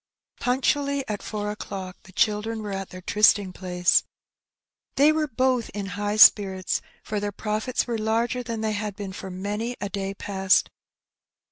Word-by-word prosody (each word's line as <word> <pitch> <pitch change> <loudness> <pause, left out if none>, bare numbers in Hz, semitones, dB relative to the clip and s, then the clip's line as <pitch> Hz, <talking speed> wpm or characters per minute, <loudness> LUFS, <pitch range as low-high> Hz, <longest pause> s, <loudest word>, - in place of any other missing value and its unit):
*' - - -37
Punctually 275 +2 0
at 210 -2 -3
four 210 -1 -4
o^clock 190 -3 -6
the 190 - -14
children 215 +3 0
were 205 - -5
at 195 -1 -4
their 185 0 -10
trysting 205 -2 +4
pla^je. 180 -1 +2 0.9
They 290 +3 +6
were 310 -1 0
both 255 -2 +1
in 205 -1 -3
high 205 0 -2
spirits, 190 -4 +5 0.2
for 210 -1 -2
their 205 0 -2
profits 215 +5 -2
were 235 -2 -2
larger 230 +3 0
than 230 -2 -4
they 220 -1 0
had 205 -1 -3
been 200 -2 -6
for 190 0 -7
many 205 +6 -3
a 200 - -3
day 195 0 -4
past. 190 -1 +2
210 Hz, 165 wpm, -25 LUFS, 195-230 Hz, 0.9 s, They